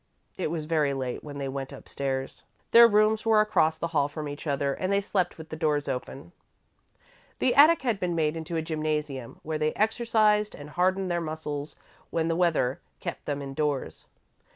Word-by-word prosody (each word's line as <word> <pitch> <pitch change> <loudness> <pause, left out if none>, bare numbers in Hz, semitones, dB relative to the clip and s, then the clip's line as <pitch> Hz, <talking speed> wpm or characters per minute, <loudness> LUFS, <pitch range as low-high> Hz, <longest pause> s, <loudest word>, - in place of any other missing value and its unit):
It - - -2
was 155 -1 -3
very 150 -3 +1
late 130 -2 -4
when 145 -1 -8
they 140 -1 -3
went 135 0 -5
up - - -11
stairs. 135 -1 -3 0.3
Their 235 0 +9
rooms 215 0 +3
were 225 -1 +4
across 160 -7 +3
the 170 - -3
hall 145 -4 +2
from 150 +1 -6
each 145 +2 -7
other 140 -1 0
and 185 +7 -2
they 200 - +3
slept 190 -3 -1
with 160 -1 -10
the - - -5
doors 150 -2 0
open. 135 +4 -5 1.1
The 255 - +2
attic 305 +2 +6
had 235 -6 0
been 175 -2 -1
made 155 -1 +1
into 165 +1 -5
a 160 - 0
gymnasium, 155 -5 -3
where 155 0 -3
they 155 0 +1
exercised 215 -1 +2
and 145 +1 -10
hardened 185 +2 +1
their 175 0 0
muscles 155 -2 -5 0.3
when 165 0 0
the 165 - +1
weather 160 -7 +1 0.2
kept - - -6
them 145 -1 -3
indoors. 140 0 -3
160 Hz, 190 wpm, -27 LUFS, 145-185 Hz, 1.1 s, Their